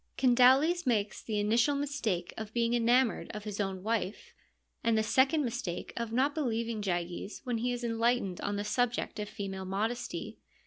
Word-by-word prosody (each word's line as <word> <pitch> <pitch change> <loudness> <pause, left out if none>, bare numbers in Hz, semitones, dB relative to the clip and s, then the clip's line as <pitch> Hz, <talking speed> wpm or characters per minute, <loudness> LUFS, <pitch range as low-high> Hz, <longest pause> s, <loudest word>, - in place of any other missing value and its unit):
Candaules 265 +6 +5
makes 210 -4 0
the 215 -2 -2
initial 230 +7 +3
mistake 255 -11 -2
of 220 -1 -7
being 235 0 +1
enamoured 240 +1 +2
of 210 - -6
his 210 -1 -5
own 190 -2 -2
wife, 220 -2 -2 0.5
and 230 -1 +3
the 220 - +2
second 265 +6 +3
mistake 235 -7 -4
of 235 -1 -3
not 265 +5 +2
believing 230 -6 -1
Gyges 175 +1 -3
when 245 -3 -1
he 245 +2 0
is 245 0 -4
enlightened 230 -4 0
on 205 - -2
the 205 - -2
subject 240 +1 -1
of 210 0 -4
female 195 -1 -5
modesty. 220 +6 -3
230 Hz, 170 wpm, -31 LUFS, 205-245 Hz, 0.5 s, Candaules